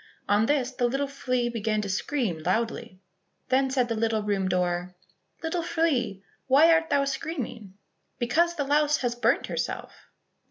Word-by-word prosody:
On 205 Hz, +2 st, +3 dB
this 265 Hz, -4 st, +1 dB
the 245 Hz, -1 st, 0 dB
little 270 Hz, +3 st, 0 dB
flea 255 Hz, -3 st, -1 dB
began 220 Hz, -2 st, -1 dB
to -, -, -3 dB
scream 205 Hz, -, -1 dB
loudly. 185 Hz, +1 st, -2 dB, 0.5 s
Then 265 Hz, +1 st, +3 dB
said 260 Hz, -2 st, +1 dB
the 230 Hz, -, -1 dB
little 220 Hz, -1 st, 0 dB
room 195 Hz, -2 st, 0 dB
door, 180 Hz, 0 st, -1 dB, 0.5 s
"Little 330 Hz, +2 st, -1 dB
flea, 295 Hz, -, 0 dB, 0.2 s
why 300 Hz, +5 st, +6 dB
art 325 Hz, 0 st, +2 dB
thou 280 Hz, -1 st, +2 dB
screaming?" 250 Hz, -, -5 dB, 0.4 s
"Because 335 Hz, +9 st, +1 dB
the 290 Hz, -, -1 dB
louse 295 Hz, +2 st, +2 dB
has 245 Hz, -2 st, 0 dB
burnt 240 Hz, -, +1 dB
herself." -, -, -4 dB
245 Hz, 155 wpm, -27 LUFS, 210-285 Hz, 0.5 s, why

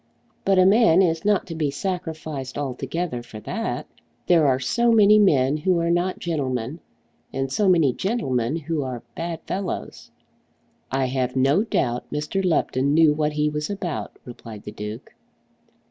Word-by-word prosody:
But 195 Hz, -1 st, +3 dB
a 185 Hz, -, +6 dB
man 195 Hz, -3 st, +5 dB
is 165 Hz, -2 st, 0 dB
not 210 Hz, -1 st, +2 dB
to 170 Hz, -, -7 dB
be 155 Hz, -3 st, -1 dB
sacrificed 155 Hz, -4 st, -4 dB
altogether 140 Hz, +1 st, -3 dB
for 115 Hz, -2 st, -10 dB
that. -, -, -3 dB, 0.4 s
There 165 Hz, -4 st, +4 dB
are 130 Hz, -1 st, +2 dB
so 235 Hz, -, +2 dB
many 215 Hz, -1 st, +6 dB
men 145 Hz, -8 st, +3 dB
who 180 Hz, +3 st, +1 dB
are 170 Hz, 0 st, +1 dB
not 175 Hz, +2 st, 0 dB
gentlemen, 135 Hz, -3 st, -3 dB, 0.5 s
and 135 Hz, 0 st, -3 dB
so 200 Hz, +6 st, +2 dB
many 165 Hz, -8 st, +4 dB
gentlemen 140 Hz, -, -1 dB
who 160 Hz, -1 st, -2 dB
are 130 Hz, -3 st, -5 dB
bad 165 Hz, -1 st, -4 dB
fellows." 195 Hz, -1 st, -5 dB, 0.8 s
"I 135 Hz, 0 st, +1 dB
have 125 Hz, 0 st, -1 dB
no 135 Hz, +9 st, +3 dB
doubt 125 Hz, -, -1 dB
Mr. 150 Hz, +6 st, -2 dB
Lupton 145 Hz, -5 st, +1 dB
knew 160 Hz, -2 st, +6 dB
what 150 Hz, 0 st, -1 dB
he 150 Hz, 0 st, +1 dB
was 150 Hz, +2 st, -3 dB
about," 190 Hz, -5 st, -4 dB
replied 115 Hz, -3 st, -10 dB
the 105 Hz, -, -7 dB
Duke. 105 Hz, +4 st, -8 dB
150 Hz, 160 wpm, -23 LUFS, 130-180 Hz, 0.8 s, a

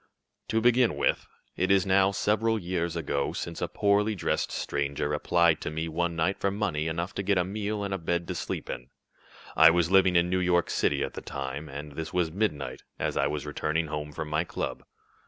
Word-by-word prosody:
"To 110 Hz, -, +1 dB
begin 120 Hz, 0 st, +4 dB
with, -, -, +1 dB, 0.3 s
it 95 Hz, -, 0 dB
is 95 Hz, -1 st, +4 dB
now 95 Hz, 0 st, +4 dB
several 110 Hz, +3 st, +1 dB
years 85 Hz, -3 st, -2 dB
ago 70 Hz, -4 st, -1 dB
since 85 Hz, -1 st, -5 dB
a -, -, 0 dB
poorly 105 Hz, +1 st, +2 dB
dressed 90 Hz, -, -1 dB
stranger 70 Hz, +1 st, -2 dB
applied 85 Hz, +2 st, +3 dB
to -, -, -3 dB
me 80 Hz, +2 st, -3 dB
one 85 Hz, +1 st, -1 dB
night 80 Hz, +4 st, 0 dB
for 100 Hz, -, +1 dB
money 95 Hz, -7 st, -1 dB
enough 85 Hz, +3 st, -3 dB
to -, -, -2 dB
get 100 Hz, 0 st, +1 dB
a 90 Hz, -, +3 dB
meal 105 Hz, +2 st, -3 dB
and 100 Hz, -1 st, -2 dB
a 95 Hz, -, -2 dB
bed 85 Hz, +1 st, -1 dB
to -, -, -1 dB
sleep -, -, -4 dB
in. 60 Hz, +1 st, -6 dB, 0.7 s
I 80 Hz, 0 st, +9 dB
was 85 Hz, 0 st, +2 dB
living 95 Hz, -2 st, +5 dB
in 85 Hz, 0 st, +4 dB
New 95 Hz, +1 st, +1 dB
York 90 Hz, -1 st, +2 dB
City -, -, +1 dB
at -, -, -4 dB
the -, -, -6 dB
time, 70 Hz, +3 st, -5 dB
and 75 Hz, +2 st, -7 dB
this 80 Hz, +3 st, -5 dB
was 90 Hz, -3 st, 0 dB
midnight, 85 Hz, -7 st, -2 dB, 0.2 s
as -, -, -2 dB
I 70 Hz, -, +2 dB
was 75 Hz, 0 st, -3 dB
returning 75 Hz, +2 st, -1 dB
home 75 Hz, 0 st, -4 dB
from 75 Hz, -, -5 dB
my 75 Hz, +2 st, 0 dB
club. -, -, -4 dB
85 Hz, 210 wpm, -28 LUFS, 75-95 Hz, 0.7 s, I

